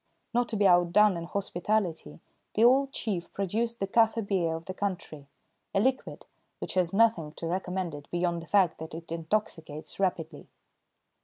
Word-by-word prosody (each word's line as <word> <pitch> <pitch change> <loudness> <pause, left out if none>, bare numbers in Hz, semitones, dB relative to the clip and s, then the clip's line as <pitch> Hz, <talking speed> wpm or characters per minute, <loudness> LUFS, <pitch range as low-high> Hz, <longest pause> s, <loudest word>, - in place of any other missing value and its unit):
Not 245 0 +1
to 225 - -1
be 205 -1 +2
outdone 180 +3 +5
in 170 0 -4
hospitality, 180 - -2 0.3
the 220 - +3
old 270 +3 +5
chief 190 -10 -3
produced 225 +5 -2
the 195 - 0
kaffir 225 +1 +2
beer 175 -5 0
of 165 0 -7
the 185 - -5
country, 180 -7 -4 0.5
a - - +4
liquid 260 +5 -1 0.3
which - - -5
has 180 -2 +1
nothing 195 -8 +2
to 165 - -7
recommend 180 0 -2
it 145 0 -10
beyond 175 -1 -1
the 165 - -12
fact 190 -3 +3
that 160 0 -7
it 165 0 -9
intoxicates 165 -3 -3
rapidly. 165 -5 -2
185 Hz, 165 wpm, -28 LUFS, 165-210 Hz, 0.5 s, outdone